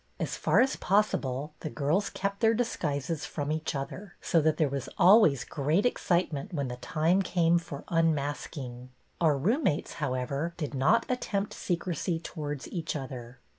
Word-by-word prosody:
As - - -2
far - - +3
as 265 - +2
possible 150 -8 0
the 155 - -4
girls 155 +8 0
kept 200 0 -3
their 225 -1 +4
disguises 160 - -2
from 145 -1 -3
each 155 -1 -2
other, 170 +8 -6
so 165 - +2
that 155 0 +2
there 155 - +3
was 135 -1 -4
always 180 - +6
great 150 - 0
excitement 175 - 0
when 140 -6 -2
the 125 - -5
time 160 +9 +1
came 175 -2 +3
for 150 -4 -8
unmask 155 -2 0
ing. 125 -2 -7 0.3
Our 155 -4 +4
roommates, 185 - +1
however, 140 +4 -2
did 150 -3 -4
not 215 - +3
at 250 -1 -1
temjDt 200 0 -2
secrecy 175 -1 -2
towards 150 -4 -5
each 170 -3 -3
other. 130 -3 -6
155 Hz, 165 wpm, -29 LUFS, 140-185 Hz, 0.3 s, always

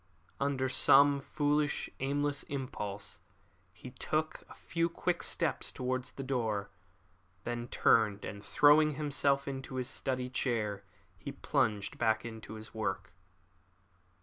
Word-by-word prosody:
Under 140 -2 0
some 140 +2 +6
foolish, 145 +1 0
aimless 145 +1 0
impulse, 105 -7 -5 0.5
he - - -11
took - - -2
a - - -12
few 170 0 -1
quick - - -1
steps - - -1
towards 130 +1 -3
the 135 - -6
door. 110 -6 -1 0.7
Then 120 0 -3
he 120 - -7
turned, 110 -4 +3
and 100 0 -7
throwing 150 +3 +5
himself 140 -2 +1
into 135 -1 -5
his 130 0 -2
study 130 -1 -2
chair 110 -5 -1 0.4
he - - -6
plunged 105 -2 0
back 110 -1 +2
into 110 -1 -8
his 110 0 -9
work. 110 -1 -3
130 Hz, 125 wpm, -32 LUFS, 110-140 Hz, 0.7 s, some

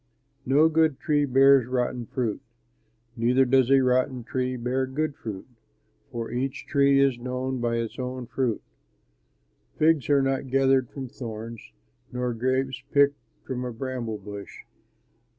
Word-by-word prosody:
"No 145 +5 +5
good 160 -3 +2
tree 145 -2 +1
bears 135 -1 +5
rotten 125 -2 -2
fruit; 120 -1 -2 0.7
neither 125 +3 +3
does 130 0 +3
a 135 0 +6
rotten 130 0 +1
tree 130 +1 -2
bear 125 +2 -1
good 145 +2 -2
fruit; 105 -9 -7 0.7
for 115 -1 -5
each 130 +3 -3
tree 140 -1 +3
is 135 -3 +3
known 125 +1 -3
by 120 -1 0
its 115 0 -3
own 125 0 -4
fruit. 120 -2 -2 1.1
Figs 155 -3 +3
are 140 -2 +4
not 135 0 -1
gathered 135 -1 +3
from 135 -2 -7
thorns, 115 -2 -7 0.5
nor 125 0 -2
grapes 130 +2 -1
picked 140 0 +4 0.3
from 125 -1 -4
a 125 - -4
bramble 120 -2 -4
bush. 100 0 -9
130 Hz, 140 wpm, -26 LUFS, 120-135 Hz, 1.1 s, a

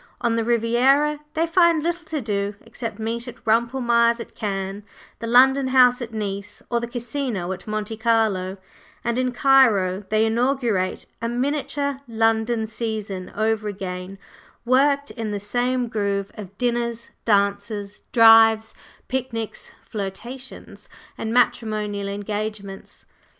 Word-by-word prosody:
On 235 -1 +1
the 230 - +1
Riviera 245 +6 +3 0.2
they 325 +1 +2
find 335 -2 +3
little 345 0 -2
to 310 -2 -3
do 205 -2 -2
except 225 -3 -7
meet 230 +2 -3
at 245 - -11
Rumpelmayer's 235 +1 +2
at 230 - -8
Cannes, 195 -1 -3 0.4
the 230 - -5
London 265 +3 +5
House 255 -1 +5
at 235 -1 -5
Nice, 200 -2 -5
or 235 - +2
the 235 - -4
Casino 240 -5 -3
at 190 - -7
Monte 215 +1 -3
Carlo; 215 -5 +1 0.5
and 235 +1 0
in 255 0 0
Cairo 225 -8 +4
they 215 +1 +3
inaugurate 230 -5 0 0.2
a 230 - -1
miniature 280 +2 -2
London 225 0 +1
"season" 215 -4 -5
over 220 0 0
again, 190 -1 -5 0.5
worked 280 +3 +3
in 225 -3 -4
the 205 -1 -3
same 245 +4 0
groove 200 -3 -2
of 200 -2 -10
dinners, 235 -1 -2
dances, 200 0 0
drives, 225 -1 +6 0.3
picnics, 245 -4 -4
flirtations, 230 +6 -7 0.3
and 220 - -4
matrimonial 215 -4 0
engagements. 205 -1 -5
225 Hz, 130 wpm, -23 LUFS, 205-250 Hz, 0.5 s, drives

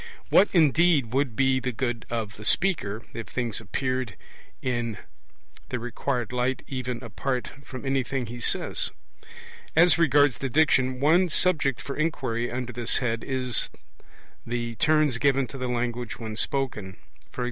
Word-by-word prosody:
What, 200 - +6
indeed, 160 - +3
would 135 -4 0
be 130 0 +3
the 130 0 -2
good 120 -1 -3
of 110 -3 -3
the 105 - -10
speaker, 115 - +1
if 115 - -6
things 120 -4 -3
appeared 130 -1 -2 0.4
in 120 -4 -2 0.7
the 125 - -2
required 120 0 -3
light 125 +1 -1
even 125 -2 -4
apart 125 +3 -3
from 130 -1 -8
anything 135 -1 -1
he 120 +2 -8
says? - - +2 0.9
As 175 +1 +6
regards 145 -5 +4
the 135 - -2
Diction, 130 -3 +3
one 170 +6 +4
subject 155 -7 +2
for 140 - -5
inquiry 130 -7 -1
under 125 0 -4
this 120 0 0
head 115 -3 -1
is 130 -2 +2 0.7
the 120 0 -3
turns 155 -6 +3
given 135 -1 +3
to 135 +3 -9
the 130 - -2
language 120 -1 -2
when 110 -2 -6
spoken; 110 -6 -2 0.4
e.g. - - -8
125 Hz, 145 wpm, -26 LUFS, 120-140 Hz, 0.9 s, What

